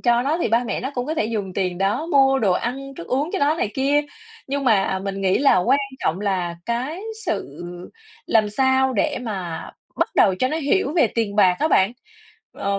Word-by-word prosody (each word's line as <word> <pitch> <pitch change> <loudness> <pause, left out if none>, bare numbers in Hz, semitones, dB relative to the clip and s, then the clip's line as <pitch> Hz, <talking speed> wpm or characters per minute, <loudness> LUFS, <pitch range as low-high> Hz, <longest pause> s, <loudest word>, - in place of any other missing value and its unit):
cho 240 -1 +3
nó, 300 +6 0
thì - - 0
ba 230 +3 +2
mẹ - - -3
nó 265 - -3
cũng 245 +1 -2
có 315 - -2
thể 265 - 0
dùng 210 -4 -3
tiền 180 -2 -1
đó 200 +11 0
mua 270 -4 +4
đồ 195 -6 +2
ăn, 275 +7 -3
thức 170 - -9
uống 280 +6 -1
cho 390 - -1
nó 290 +2 +2
này 220 -10 -2
kia. 280 +2 +2 0.5
Nhưng 280 0 -2
mà 195 -5 +2
mình 195 0 -4
nghĩ 190 -1 +2
là 280 0 +4
quan 225 +10 +3 0.2
trọng 175 +5 -1
là 180 -4 -1
cái 255 +9 -2 0.3
sự - - -2 0.7
làm 215 -2 +2
sao 265 +3 +2
để 295 +3 0
mà 190 -8 -5 0.3
bắt - - +1
đầu 190 -3 +4
cho 255 - +1
nó 310 - -2
hiểu 310 +1 +1
về 300 -8 +5
tiền 215 -3 -1
bạc 185 -3 +5
á 310 - +1
bạn, 195 -5 +3 0.6
ờ, 200 0 -2
240 Hz, 215 wpm, -22 LUFS, 195-275 Hz, 0.7 s, về